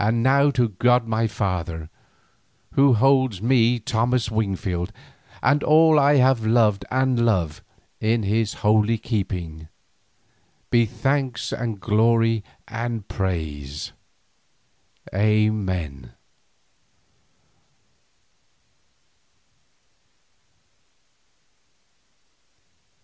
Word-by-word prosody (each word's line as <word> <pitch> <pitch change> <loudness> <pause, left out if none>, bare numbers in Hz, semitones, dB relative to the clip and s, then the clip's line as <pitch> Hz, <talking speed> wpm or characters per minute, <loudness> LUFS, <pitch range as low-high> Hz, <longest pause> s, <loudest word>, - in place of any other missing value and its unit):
And 115 +2 +1
now 140 +2 +4
to 125 -4 +1
God 120 +4 +2
my 115 0 0
Father, 90 -6 -3 0.8
Who 135 -1 +4
holds 130 -3 +2
me, 120 +1 +2
Thomas 115 +1 -1
Wingfield, 95 -5 -2 0.5
and 145 +4 +2
all 155 0 +5
I 145 +1 +4
have 130 -3 +3
loved 110 -3 +2
and 130 -2 +1
love 90 -10 0 0.4
in 110 +1 0
His 105 +2 -1
holy 110 +1 +3
keeping, 90 -9 -4 1.0
be 120 -1 +3
thanks 135 +1 -2
and 115 -4 -4
glory 115 +2 +2 0.2
and 115 -1 -5
praise! 75 -7 -4 1.2
Amen. 95 - -1
110 Hz, 75 wpm, -22 LUFS, 100-125 Hz, 1.2 s, all